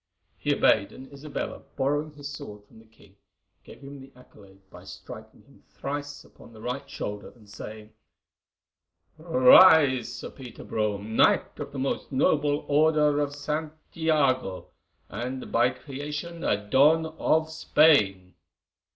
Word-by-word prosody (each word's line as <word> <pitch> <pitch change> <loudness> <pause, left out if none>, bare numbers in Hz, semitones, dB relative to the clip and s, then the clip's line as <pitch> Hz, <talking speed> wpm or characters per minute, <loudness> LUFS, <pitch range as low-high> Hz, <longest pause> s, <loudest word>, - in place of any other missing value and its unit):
He - - 0
obeyed, 100 - +2
and 135 +2 -13
Isabella, 140 +2 -6
borrowing 145 +3 -1
his 145 -1 -9
sword 105 -7 -9
from 110 - -19
the 115 - -20
king, 105 -3 -23 0.5
gave - - -15
him 140 0 -10
the 135 0 -14
accolade 100 -6 -19
by - - -13
striking - - -12
him - - -23
thrice 145 +1 -6
upon 115 - -18
the 110 - -14
right 125 +3 -5
shoulder 105 0 -6
and 110 -3 -20
saying: 105 +1 -10 1.3
"Rise, 150 -2 +6
Sir - - -8
Peter 125 -4 -11
Brome, 105 0 -3
Knight - - +2
of - - -6
the 140 - -8
most 135 +2 -3
noble 145 +2 +1
Order 150 0 +3
of 145 -1 -2
Saint 150 +2 -4 0.2
Iago, 140 - 0 0.4
and 125 +5 -6
by 120 +2 +3
creation 150 +5 -7
a 105 0 -1
Don 150 +7 +4
of 160 0 0
Spain." 105 - +2
140 Hz, 140 wpm, -26 LUFS, 110-150 Hz, 1.3 s, Rise